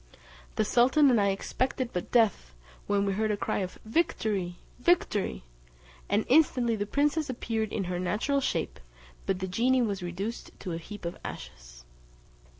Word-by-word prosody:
The 215 - +2
sultan 265 +6 +5
and 230 -4 +4
I 200 - +3
expected 250 +5 -1
but 180 - -3
death, 205 - +2 0.3
when 200 0 +2
we 195 - 0
heard 215 +2 0
a 210 - 0
cry - - -1
of 185 -2 -4
"Victory! 215 - 0 0.2
Victory!" 230 - +1 0.7
and 205 +2 +2
instantly 250 -5 +4
the 205 -1 -3
princess 295 +4 +1
appeared 225 -3 -2
in 200 - -1
her 180 -1 -3
natural 220 +10 0
shape, - - -2 0.5
but 190 - +1
the 190 0 -3
genie 245 +7 +2
was 200 -4 -2
reduced 185 +6 -4
to 185 - -4
a 165 - -3
heap 205 +3 -9
of 170 - -4
ashes. - - -9
210 Hz, 160 wpm, -29 LUFS, 185-245 Hz, 0.7 s, sultan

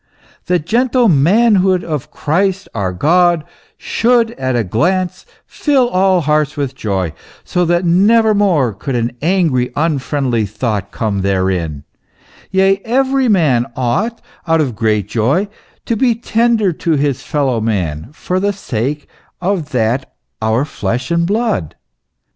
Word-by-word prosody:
The 180 - +3
gentle 240 - +1
manhood 190 +3 +3
of 150 -5 -4
Christ 190 +5 -1
our 100 -4 -2
God, 170 - +2 0.3
should 235 -1 +1
at 130 - -2
a 120 - +1
glance 175 - -1 0.2
fill 275 -5 +1
all 185 -3 +2
hearts 150 -1 0
with 140 -2 -2
joy, 95 - -2 0.3
so 180 -1 0
that 175 +1 +1
never 215 +6 +4
more 175 - +2
could 130 +6 -4
an 120 0 0
angry, 160 -7 +1
unfriendly 135 -7 0
thought 105 -2 -3
come 100 -2 -2
therein 95 -6 -1 0.7
yea, 195 +1 +2
every 265 +2 +1
man 150 - +2
ought, 195 - -1 0.3
out 165 0 +3
of 135 -7 -1
great 105 -3 0
joy, 135 - +1 0.4
to 230 - 0
be 240 +1 +2
tender 230 -3 +1
to 165 +1 -1
his 140 -3 0
fellow 135 -6 -1
man, 90 -6 -2
for 180 +4 -3
the 200 +1 0
sake 145 - -3 0.3
of 180 -4 -1
that 125 0 -1 0.3
our 110 +5 +1
flesh 125 - -3
and 170 0 +1
blood." 210 - -1
155 Hz, 135 wpm, -16 LUFS, 120-195 Hz, 0.7 s, never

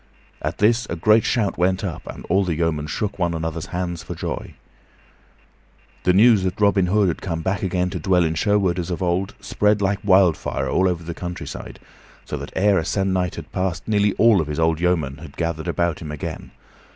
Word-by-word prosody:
At - - -3
this 115 +3 +2
a - - -2
great 110 +6 +4
shout 110 -8 0
went 95 +2 +1
up, 90 -5 -5
and - - -8
all 100 +1 +2
the 90 -4 -1
yeomen 75 -2 -1
shook 105 +5 -3
one 85 -2 0
another's 80 0 -4
hands 85 -2 -3
for - - -7
joy. - - -5 1.5
The 90 - +5
news 110 +1 +6
that 95 +1 -2
Robin 100 -3 +3
Hood 100 +1 +3
had 85 - -2
come 80 -3 -3
back 95 +3 -1
again 90 -1 0
to - - -4
dwell 90 -3 +3
in 80 -1 0
Sherwood 95 +1 +1
as 85 0 -4
of 90 +1 -3
old 90 +2 -1
spread 105 0 +1
like 100 0 0
wildfire 95 -8 +3
all 95 +8 +2
over 85 -2 -3
the 85 +1 -5
countryside, 90 +1 -7 0.5
so - - -4
that - - -7
ere 100 0 +3
a - - -2
se'ennight 95 0 0
had - - -9
passed 95 -2 -2
nearly 105 -2 +2
all 110 -5 +5
of 75 - -4
his 75 +1 -3
old 80 -1 +2
yeomen 80 -6 0
had 75 -2 -12
gathered 85 -1 -2
about 85 -2 0
him 75 -2 -6
again. 75 - -6
90 Hz, 205 wpm, -22 LUFS, 85-100 Hz, 1.5 s, news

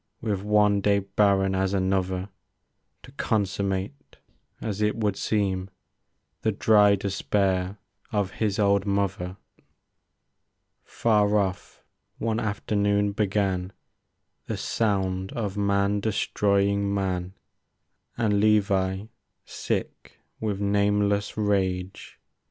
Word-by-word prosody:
With 105 -4 -2
one 105 -1 +3
day 100 0 +3
barren 100 -1 +2
as 95 +1 0
another; 95 0 0 0.7
To 125 - -13
consummate, 100 +1 -2 0.4
as 105 -2 -4
it 105 0 +2
would 105 -3 0
seem. 95 -3 -1 0.7
The 110 - +1
dry 105 -1 +5
despair 95 -1 -1 0.3
of 100 -3 0
his 105 -2 -1
old 100 -1 +2
mother. 100 -2 -1 1.5
Far 105 -2 +2
off 95 -2 -3 0.3
one 115 0 -1
afternoon 105 -1 0
began 95 -2 -1 0.7
The - - -3
sound 95 -3 -1
of 105 -4 -3
man 100 0 +1
destroying 100 -1 +1
man; 95 -2 -2 0.8
And 105 -4 +2
Levi, 100 -2 +2 0.4
sick - - -4 0.2
with 105 -3 -2
nameless 100 0 +1
rage. 95 -3 -1
100 Hz, 95 wpm, -26 LUFS, 95-105 Hz, 1.5 s, dry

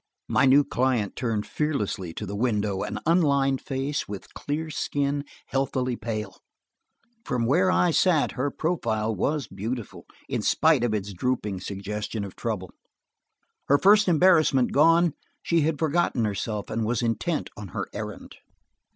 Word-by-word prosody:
My 135 - +3
new 140 +2 +6
client 125 -7 0
turned 115 -4 -1
fearlessly 105 - -2
to 105 - -4
the 100 +1 -5
window 105 -4 0
an - - -3
unlined 140 -5 +3
face, 135 +1 -3
with 100 -2 -7
a - - -23
clear 155 +2 -4
skin, 145 -1 -1 0.2
healthily 130 -2 -1
pale. 110 -5 -5 0.9
From 125 - -1
where 175 +10 +3
I 180 -1 +3
sat, 165 -2 +3
her 135 +2 -1
profile 115 -10 -1
was 140 - -1
beautiful, 110 +4 -6 0.2
in - - -2
spite 155 -6 +3
of 115 -3 +1
its 100 -1 -4
drooping 105 -2 -2
suggestion 100 +3 -4
of 100 - -8
trouble; 105 -6 -4 1.0
her 140 - +5
first 205 +5 +5
embarrassment 160 -7 +4
gone, 165 +2 +4 0.3
she 170 -1 +2
had 155 0 +1
forgotten 155 -6 +1
herself 105 0 -3
and 115 - -1
was 115 +2 0
intent 150 +8 -1
on 105 -1 -8
her - - -4
errand. - - -7
130 Hz, 150 wpm, -26 LUFS, 105-150 Hz, 1.0 s, new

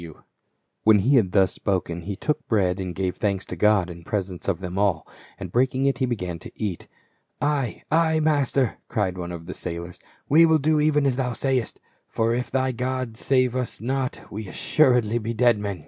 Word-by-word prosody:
436 85 -2 -9
PAUL. - - -26 0.6
When 110 -1 +6
he 130 +9 +3
had 95 -7 +2
thus 95 -2 +3
spoken 90 -3 -2
he 100 +4 -5
took 150 +8 -2
bread, 95 -4 +1
and 90 -2 -4
gave 95 -1 -2
thanks 100 -4 -1
to - - -6
God 105 0 +3
in 85 -1 -10
presence 95 -1 -4
of 95 -4 0
them 90 0 -4
all: 95 -6 +1 0.3
and - - -6
break 130 +2 +2
ing 135 +1 +1
it, 135 -3 +1
he 130 - +1
began 90 -8 -3
to - - -10
eat. 100 -6 -4 0.5
"Ay, 145 -5 -1
ay, 160 0 +3
master," 140 -5 +1
cried 95 -4 -1
one 90 -1 -5
of 85 -1 -7
the 90 - -6
sailors, 85 0 -6 0.3
"we 160 +4 +6
will 160 -1 +5
do 155 +1 +2
even 150 -1 +3
as 130 -2 +1
thou 125 -2 -1
sayest; 130 -1 -1 0.3
for 115 +1 0
if 125 +1 -2
thy 130 0 0
God 125 -1 -3
save 130 0 +1
us 125 -2 -3
not 130 +2 -2
we 105 +1 -5
be - - -9
assuredly 125 -5 +2 0.2
dead 120 -2 +4
men." 100 -3 -4
110 Hz, 210 wpm, -24 LUFS, 95-130 Hz, 0.6 s, When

